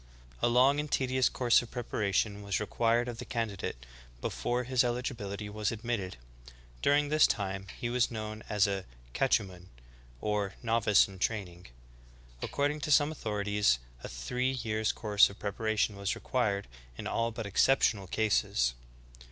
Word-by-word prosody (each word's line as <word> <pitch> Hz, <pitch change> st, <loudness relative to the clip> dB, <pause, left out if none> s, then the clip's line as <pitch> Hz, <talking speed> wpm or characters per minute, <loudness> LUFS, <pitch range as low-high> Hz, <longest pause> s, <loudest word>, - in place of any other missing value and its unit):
A -, -, +4 dB
long 130 Hz, +4 st, +4 dB
and 150 Hz, 0 st, -3 dB
tedious 130 Hz, -1 st, +2 dB
course 120 Hz, -2 st, +3 dB
of 120 Hz, -, -10 dB
preparation 105 Hz, -3 st, -1 dB
was 100 Hz, -2 st, -1 dB
required 115 Hz, +3 st, +1 dB
of 120 Hz, -1 st, -6 dB
the -, -, -4 dB
candidate 100 Hz, -, -4 dB, 0.3 s
before 120 Hz, -, -2 dB
his 130 Hz, +1 st, +2 dB
eligibihty 120 Hz, -5 st, -3 dB
was 105 Hz, 0 st, -2 dB
admitted; 110 Hz, -, -3 dB, 0.6 s
during 145 Hz, 0 st, +3 dB
this 155 Hz, 0 st, +5 dB
time 95 Hz, -1 st, -2 dB
he 120 Hz, -, -2 dB
was 120 Hz, 0 st, +1 dB
known 110 Hz, -1 st, -5 dB
as 105 Hz, -1 st, +3 dB
a 100 Hz, -2 st, -2 dB, 0.3 s
catechumen, 95 Hz, -, 0 dB, 0.5 s
or 105 Hz, 0 st, -1 dB
novice 115 Hz, -3 st, +4 dB
in 95 Hz, -1 st, -12 dB
training. 90 Hz, -5 st, -3 dB, 0.7 s
According 145 Hz, +1 st, -1 dB
to 150 Hz, -, -2 dB
some 145 Hz, +1 st, +5 dB
authorities 105 Hz, -, +1 dB, 0.3 s
a -, -, -6 dB
three 125 Hz, -, -2 dB
years' 110 Hz, -3 st, -1 dB
course 105 Hz, -2 st, +4 dB
of 100 Hz, -, -12 dB
preparation 105 Hz, 0 st, -1 dB
was 100 Hz, 0 st, -2 dB
required 100 Hz, -6 st, -1 dB, 0.3 s
in -, -, -6 dB
all 115 Hz, 0 st, 0 dB
but 115 Hz, -1 st, -6 dB
exceptional 100 Hz, -1 st, +3 dB
cases.'' 90 Hz, -, +1 dB
110 Hz, 145 wpm, -31 LUFS, 100-120 Hz, 0.7 s, this